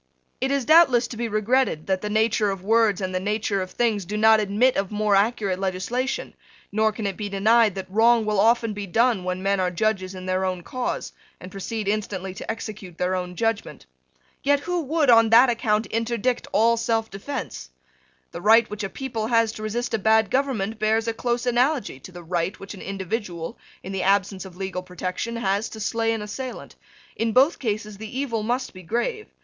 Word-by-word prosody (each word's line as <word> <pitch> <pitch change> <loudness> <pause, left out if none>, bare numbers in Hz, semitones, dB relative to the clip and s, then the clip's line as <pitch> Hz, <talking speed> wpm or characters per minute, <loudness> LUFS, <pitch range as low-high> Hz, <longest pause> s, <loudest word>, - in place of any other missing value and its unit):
It 265 - +1
is 275 -2 0
doubtless 285 -7 +5
to - - -7
be 235 +1 -2
regretted 215 -5 +1
that 190 -1 0
the 210 - -3
nature 220 0 +2
of 195 -2 -4
words 220 -1 +3
and 185 -1 -3
the 185 - 0
nature 205 0 -1
of 185 - -4
things 220 -3 0
do 205 +4 -4
not 220 0 +6
admit 215 +5 +2
of 195 -1 -1
more 210 -1 +1
accurate 200 -2 +1
legislation: 195 +8 -2 0.4
nor 220 +1 +2
can 215 0 -6
it 195 -2 -2
be 205 +1 -4
denied 215 +1 +3
that 190 -1 -4
wrong 225 +3 +4
will 210 -2 0
often 230 0 +3
be 205 -1 -5
done 225 +1 +2
when 185 +1 -3
men 195 0 +1
are 185 -1 +1
judges 190 0 -1
in 185 0 -8
their 185 0 0
own 185 -2 -2
cause, 255 +6 -4 0.3
and 185 - -10
proceed 200 +2 -4
instantly 200 -3 -2
to - - -9
execute 210 -6 -6
their 180 +1 0
own 180 -1 -3
judgment. 225 - -2 0.6
Yet 285 0 +2
who 355 +2 -1
would, 300 -2 +2
on 230 -1 +6
that 240 +3 +7
account, 220 -2 0
interdict 235 +2 -1
all 230 +2 +3
selfdefence? 225 - -3 0.6
The 170 - -7
right 225 +3 +6
which 210 0 -5
a 195 - -2
people 230 -4 -4
has 230 -2 +3
to 215 - -9
resist 230 +3 -3
a 225 - +1
bad 220 0 +3
government 225 -6 -1
bears 220 +1 +1
a 230 - 0
close 240 +1 -2
analogy 245 - +1
to 185 - -12
the 175 -1 -10
right 170 +2 -2
which 195 - -8
an 195 - -10
individual, 190 -3 -4 0.3
in 190 - -6
the 195 -1 -2
absence 195 0 +1
of 180 -2 -12
legal 190 -1 -4
protection, 185 +5 -4
has 205 -1 -1
to 220 - -9
slay 225 +1 0
an 225 -2 -2
assailant. 255 +4 -7 0.4
In 225 -1 -1
both 270 +8 +4
cases 215 -3 -3
the 220 +3 -7
evil 235 -6 -1
must 245 +4 -2
be 185 - -11
grave. 240 - -2
215 Hz, 200 wpm, -24 LUFS, 195-235 Hz, 0.6 s, that